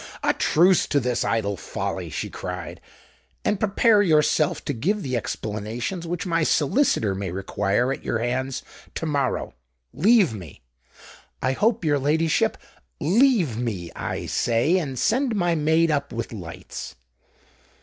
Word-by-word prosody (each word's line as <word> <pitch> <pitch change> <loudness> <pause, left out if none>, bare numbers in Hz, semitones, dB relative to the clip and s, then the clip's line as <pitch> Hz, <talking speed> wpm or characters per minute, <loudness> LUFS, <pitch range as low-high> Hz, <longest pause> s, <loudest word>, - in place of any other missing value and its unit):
"A - - +3
truce 180 +3 +3
to 145 - +2
this 125 -2 0
idle 100 -3 0
folly!" 90 - -4
she - - -4
cried; - - -6 0.6
"and 205 - +1
prepare 215 +1 +4
yourself 155 -4 +2
to 145 - -1
give 190 - -1
the 130 -1 -2
explanations 115 - -4
which 175 +2 -3
my 170 -2 +1
solicitor 150 - +2
may 95 0 -4
require 100 +6 0
at - - -9
your - - -1
hands 125 +3 -2 0.3
to - - -3
morrow. 140 - -1 0.4
Leave 205 - +4
me." 90 - -10 0.8
"I 130 - +1
hope 210 - +1
your 145 -2 +2
ladyship——" 155 +3 +1 0.4
"Leave 195 - +3
me, 105 -8 -3
I - - -4
say; 125 +11 +2
and 135 -6 -4
send 245 - +1
my 175 -3 +1
maid 160 +1 +2
up 140 -1 -1
with 115 0 -5
lights." 90 -6 -8
145 Hz, 140 wpm, -24 LUFS, 115-175 Hz, 0.8 s, prepare